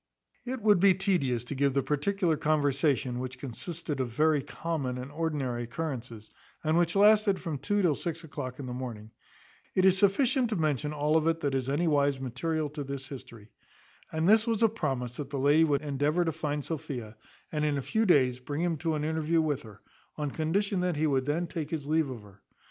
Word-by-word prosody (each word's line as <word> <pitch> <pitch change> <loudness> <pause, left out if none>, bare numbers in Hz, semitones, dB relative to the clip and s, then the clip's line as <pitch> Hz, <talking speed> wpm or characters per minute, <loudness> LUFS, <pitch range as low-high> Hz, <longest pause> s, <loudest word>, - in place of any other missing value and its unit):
It 255 0 -4
would 210 -4 +5
be 190 0 +6
tedious 170 - 0
to 125 - -6
give 140 0 +1
the 140 - +2
particular 165 +3 +1
conversation, 145 -4 +1
which 130 0 -5
consisted 145 +4 -5
of 130 -2 -1
very 150 +5 +2
common 140 -4 -3
and 130 +2 -7
ordinary 145 -7 -2
occurrences, 120 -5 -6 0.3
and 155 0 +2
which 170 0 +2
lasted 210 -1 +5
from 160 -6 -4
two 205 +4 0
till 170 -4 +4
six 165 +3 -4
o'clock 130 -5 -6
in 140 - -6
the 125 - -5
morning. 115 -4 -6 0.6
It 185 - +4
is 190 0 +5
sufficient 245 +5 +3
to 220 - -1
mention 150 -3 0
all 150 +1 +2
of 160 0 +1
it 165 0 +1
that 140 -1 0
is 135 -1 -1
anywise 145 -2 +2
material 150 +5 -2
to 150 -1 -5
this 140 0 -6
history. 120 -6 -10 0.6
And 160 +1 0
this 220 +3 +5
was 230 -1 +1
a 225 - +6
promise 135 - -3
that 145 -2 -5
the 140 - -4
lady 145 +4 +4
would 145 -1 +1
endeavour 150 +4 +1
to 165 - +1
find 150 -2 -2
out - - -12
Sophia, 135 -9 -5 0.4
and 150 -1 -1
in 150 -1 +1
a - - -1
few 220 - +1
days 130 -7 +4
bring 145 +4 -4
him 170 -2 0
to 160 0 -1
an 150 - -2
interview 160 +1 +1
with 150 -4 0
her, 105 -3 -14 0.4
on 150 -2 -2
condition 185 +6 0
that 180 -2 0
he 155 +2 +1
would 135 -3 +1
then 160 +4 0
take 160 -3 -5
his 155 -4 -3
leave 155 -1 +1
of 120 -5 -7
her. 100 -1 -17
150 Hz, 210 wpm, -29 LUFS, 135-165 Hz, 0.6 s, be